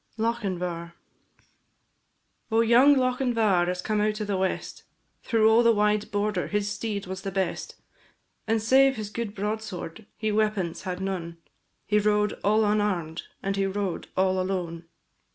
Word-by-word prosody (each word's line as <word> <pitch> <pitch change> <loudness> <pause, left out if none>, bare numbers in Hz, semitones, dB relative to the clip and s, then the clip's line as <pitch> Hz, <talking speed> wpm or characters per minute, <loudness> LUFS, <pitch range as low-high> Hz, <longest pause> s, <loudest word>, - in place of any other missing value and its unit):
LOCHINVAR. 180 -7 -2 1.6
Oh, 225 +1 +4
young 245 +5 +6
Lochinvar 235 -8 +2
is 180 0 -3
come 215 -1 0
out 210 0 0
of 210 - -2
the 200 -1 -1
west, 190 0 -2 0.4
Through 225 -2 +3
all 220 +1 +6
the 230 -1 +5
wide 210 0 +1
border 210 +1 -1
his 205 0 -1
steed 205 -2 -3
was 190 +1 -6
the 195 - -4
best; 190 -2 -3 0.7
And 220 -1 +1
save 270 +3 +5
his 210 -2 -6
good 220 -2 -4
broadsword 210 -2 -5
he 215 -1 -1
weapons 210 -5 0
had 180 +1 -4
none, 175 -3 -4 0.5
He 210 0 +2
rode 210 0 +2
all 215 +2 +3
unarm'd, 195 -6 -1 0.2
and 195 0 -1
he 195 0 +1
rode 195 -2 -3
all 185 0 +2
alone. 175 -3 -3
205 Hz, 150 wpm, -26 LUFS, 190-220 Hz, 1.6 s, young